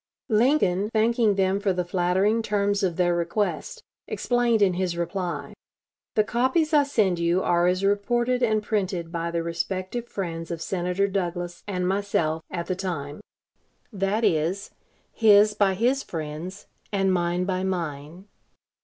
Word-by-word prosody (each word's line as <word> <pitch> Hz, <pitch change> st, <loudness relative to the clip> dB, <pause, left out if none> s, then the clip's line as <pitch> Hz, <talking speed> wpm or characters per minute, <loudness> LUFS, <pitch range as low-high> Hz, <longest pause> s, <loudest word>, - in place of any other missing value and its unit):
Lincoln, 215 Hz, -5 st, +2 dB
thanking 225 Hz, -1 st, +2 dB
them 190 Hz, 0 st, +1 dB
for 200 Hz, -2 st, +1 dB
the 180 Hz, -1 st, -2 dB
flattering 190 Hz, +5 st, +1 dB
terms 205 Hz, -1 st, 0 dB
of 180 Hz, -4 st, 0 dB
their 175 Hz, -1 st, +2 dB
request, 175 Hz, +5 st, -2 dB, 0.2 s
explained 240 Hz, -3 st, +1 dB
in 190 Hz, -2 st, +3 dB
his 175 Hz, -1 st, -2 dB
reply: 175 Hz, +1 st, -3 dB, 0.6 s
"The 215 Hz, -, +4 dB
copies 260 Hz, +8 st, +1 dB
I 290 Hz, -2 st, +5 dB
send 200 Hz, -10 st, +1 dB
you, 170 Hz, +2 st, +1 dB
are 175 Hz, 0 st, +2 dB
as 185 Hz, +2 st, +1 dB
reported 240 Hz, +5 st, +1 dB
and 215 Hz, -3 st, +2 dB
printed 185 Hz, -6 st, -2 dB
by 170 Hz, -1 st, -2 dB
the 170 Hz, 0 st, -2 dB
respective 185 Hz, +7 st, -3 dB
friends 165 Hz, -6 st, -5 dB
of 170 Hz, -, -4 dB
Senator 180 Hz, +3 st, -1 dB
Douglas 175 Hz, -2 st, -3 dB
and 180 Hz, -3 st, -1 dB
myself 185 Hz, -5 st, 0 dB
at 170 Hz, -, -4 dB
the 185 Hz, -, -2 dB
time 165 Hz, -5 st, -5 dB, 0.7 s
that 200 Hz, +3 st, 0 dB
is, 170 Hz, +3 st, 0 dB, 0.4 s
his 210 Hz, -1 st, +5 dB
by 200 Hz, -2 st, +2 dB
his 250 Hz, +7 st, +1 dB
friends, 165 Hz, -, -6 dB, 0.3 s
and 195 Hz, -2 st, +2 dB
mine 175 Hz, 0 st, 0 dB
by 185 Hz, -1 st, -1 dB
mine. 170 Hz, -1 st, -4 dB
190 Hz, 145 wpm, -25 LUFS, 175-210 Hz, 0.7 s, I